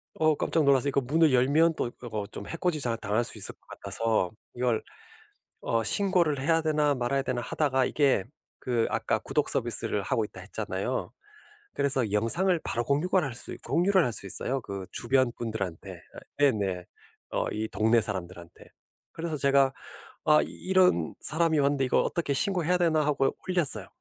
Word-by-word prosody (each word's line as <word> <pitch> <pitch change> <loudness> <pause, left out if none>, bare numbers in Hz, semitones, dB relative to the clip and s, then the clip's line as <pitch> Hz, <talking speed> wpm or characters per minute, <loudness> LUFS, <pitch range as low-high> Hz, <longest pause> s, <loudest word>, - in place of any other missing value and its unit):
어 155 -1 +2
깜짝 160 +2 0
놀라서 140 0 +3
이거 140 - +1
문을 150 +4 +2
열면 150 +6 +3
또 120 - -2
요거 110 -4 -5
좀 - - -7
해코지 165 -2 -1
자 120 -3 +1
당할 110 +2 -1
수 - - +2
있을 - - +1
것 - - -62
같아서 110 -5 -1 0.2
이걸 120 -2 -1 0.8
'어 115 -1 -1
신고를 175 - +3
해야 165 +3 +2
되나 150 -2 +1
말아야 130 +2 -1
되나?' 125 -2 -3
하다가 135 +1 0
이게 140 -9 +1 0.4
그 120 -3 -1
아까 - - -1
"구독 - - -1
서비스를 - - +1
하고 - - -1
있다." - - -12
했잖아요. - - -4 0.7
그래서 130 -6 +1
영상을 165 - +2
바로 120 - -1
공유갈 175 +8 +1
할 135 - -5
수 - - -2
공유를 185 +1 +2
할 125 - -1
수 100 - +4
있어요 135 +7 +2
그 100 -4 -7
주변 130 0 +1
분들한테. 110 -7 -5 0.2
아 - - -8 0.2
네네. 100 -10 +1 0.5
어 - - -1
이 110 +1 -3
동네 110 +2 +2
사람들한테. 90 -4 -5 0.5
그래서 165 -1 -4
제가 140 -1 +3 0.5
"아 150 -1 +5
이 - - -7
이런 185 - +1
사람이 160 0 +2
왔는데 140 -1 +1
이거 125 - +2
어떻게 165 -5 -2
신고해야 180 +3 +1
되나." 160 -3 +2
하고 135 -2 0
올렸어요. 175 -6 +3
135 Hz, 345 characters per minute, -27 LUFS, 115-160 Hz, 0.8 s, 아